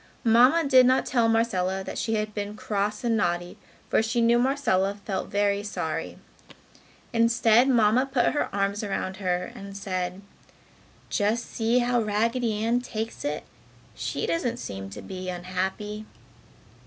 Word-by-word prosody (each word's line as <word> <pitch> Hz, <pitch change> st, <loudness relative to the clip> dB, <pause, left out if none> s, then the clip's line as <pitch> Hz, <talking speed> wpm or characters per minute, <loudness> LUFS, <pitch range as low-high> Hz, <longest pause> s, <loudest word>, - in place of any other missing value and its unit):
Mamma 250 Hz, +8 st, +5 dB
did 255 Hz, -2 st, +6 dB
not 260 Hz, +1 st, +3 dB
tell 235 Hz, -3 st, +2 dB
Marcella 190 Hz, -5 st, +1 dB
that -, -, -5 dB
she 225 Hz, -1 st, 0 dB
had 215 Hz, 0 st, -2 dB
been 205 Hz, 0 st, -4 dB
cross 210 Hz, +1 st, -2 dB
and 235 Hz, -1 st, +2 dB
naughty 175 Hz, -3 st, -1 dB, 0.3 s
for -, -, +3 dB
she 225 Hz, +2 st, -1 dB
knew 235 Hz, +1 st, +4 dB
Marcella 240 Hz, -8 st, +1 dB
felt 195 Hz, -, -3 dB
very 205 Hz, 0 st, +1 dB
sorry. 210 Hz, +1 st, -4 dB, 1.0 s
Instead 230 Hz, +2 st, +4 dB
Mamma 240 Hz, +1 st, +4 dB
put 260 Hz, -3 st, +2 dB
her 295 Hz, -, 0 dB
arms 200 Hz, +1 st, -1 dB
around 190 Hz, -2 st, -3 dB
her 180 Hz, -2 st, -2 dB
and 195 Hz, 0 st, -9 dB
said, 185 Hz, -1 st, -3 dB, 0.9 s
"Just 220 Hz, +2 st, +1 dB
see 230 Hz, +2 st, +1 dB
how 245 Hz, -1 st, +2 dB
Raggedy 220 Hz, +1 st, 0 dB
Ann 240 Hz, +2 st, +2 dB
takes 225 Hz, 0 st, -5 dB
it! 290 Hz, -, -2 dB, 0.5 s
She -, -, -3 dB
doesn't 245 Hz, -8 st, -1 dB
seem 95 Hz, -, -6 dB
to 95 Hz, -, -9 dB
be 185 Hz, -1 st, -6 dB
unhappy!" 190 Hz, +4 st, -4 dB
215 Hz, 145 wpm, -26 LUFS, 195-235 Hz, 1.0 s, did